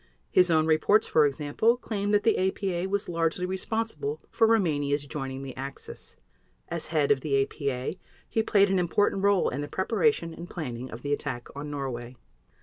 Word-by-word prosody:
His 180 Hz, -1 st, +5 dB
own 160 Hz, -1 st, +4 dB
reports, 160 Hz, +7 st, +4 dB
for 150 Hz, -2 st, +4 dB
example, 150 Hz, -, +1 dB
claim 205 Hz, -4 st, -3 dB
that 205 Hz, 0 st, +3 dB
the 225 Hz, -, +3 dB
APA 190 Hz, -2 st, -2 dB
was 200 Hz, 0 st, -1 dB
largely 165 Hz, +1 st, 0 dB
responsible 225 Hz, -, -3 dB
for 225 Hz, -, +4 dB
Rumania's 145 Hz, -10 st, +1 dB
joining 135 Hz, -2 st, -5 dB
the 135 Hz, -2 st, -7 dB
Axis. 135 Hz, +1 st, -8 dB, 0.5 s
As -, -, -2 dB
head 155 Hz, -3 st, +1 dB
of 135 Hz, -2 st, +3 dB
the 140 Hz, -2 st, +1 dB
APA, 135 Hz, +3 st, -3 dB, 0.3 s
he 225 Hz, -, +1 dB
played 200 Hz, -2 st, +3 dB
an 190 Hz, -, +3 dB
important 190 Hz, +3 st, +1 dB
role 200 Hz, -2 st, +3 dB
in 140 Hz, -, -3 dB
the 145 Hz, -, -4 dB
preparation 205 Hz, -, +1 dB
and 170 Hz, +2 st, -9 dB
planning 130 Hz, -6 st, -5 dB
of 115 Hz, -, -9 dB
the 145 Hz, 0 st, 0 dB
attack 120 Hz, -4 st, -4 dB
on 145 Hz, +1 st, -5 dB
Norway. 130 Hz, -4 st, -5 dB
160 Hz, 175 wpm, -27 LUFS, 140-200 Hz, 0.5 s, His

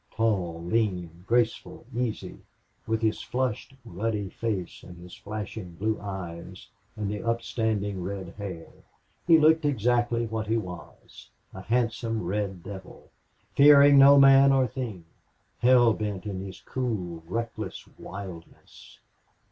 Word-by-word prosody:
Tall, 95 Hz, -7 st, -1 dB
lean, 90 Hz, -4 st, -2 dB
graceful, 120 Hz, 0 st, 0 dB
easy, 120 Hz, -3 st, -3 dB, 0.5 s
with 110 Hz, 0 st, -1 dB
his 110 Hz, -1 st, +1 dB
flushed 130 Hz, 0 st, -3 dB
ruddy 105 Hz, 0 st, -3 dB
face 100 Hz, -7 st, -4 dB
and 90 Hz, -1 st, -12 dB
his 90 Hz, +1 st, -12 dB
flashing 105 Hz, -3 st, -7 dB
blue 110 Hz, +4 st, -1 dB
eyes 90 Hz, -4 st, -7 dB, 0.3 s
and 105 Hz, -2 st, -3 dB
the 105 Hz, 0 st, -3 dB
upstanding 110 Hz, -4 st, -1 dB
red 95 Hz, +1 st, -5 dB
hair, 95 Hz, -5 st, -8 dB, 0.6 s
he 165 Hz, -2 st, +8 dB
looked 160 Hz, +1 st, +4 dB
exactly 120 Hz, -3 st, +1 dB
what 110 Hz, -1 st, -4 dB
he 115 Hz, +1 st, +1 dB
was 90 Hz, -7 st, -9 dB, 0.2 s
a 95 Hz, -, -8 dB
handsome 115 Hz, -1 st, -1 dB
red 95 Hz, -1 st, -3 dB
devil, 95 Hz, -1 st, -11 dB, 0.4 s
fearing 140 Hz, 0 st, +8 dB
no 140 Hz, +1 st, +8 dB
man 135 Hz, 0 st, +7 dB
or 135 Hz, -1 st, +3 dB
thing, 110 Hz, -8 st, -6 dB, 0.5 s
hell 120 Hz, -2 st, +5 dB
bent 105 Hz, -4 st, -4 dB
in 95 Hz, -3 st, -4 dB
his 95 Hz, -1 st, -9 dB
cool, 100 Hz, -10 st, -4 dB
reckless 115 Hz, +4 st, -5 dB
wildness. 95 Hz, -4 st, -11 dB
110 Hz, 125 wpm, -27 LUFS, 95-120 Hz, 0.6 s, he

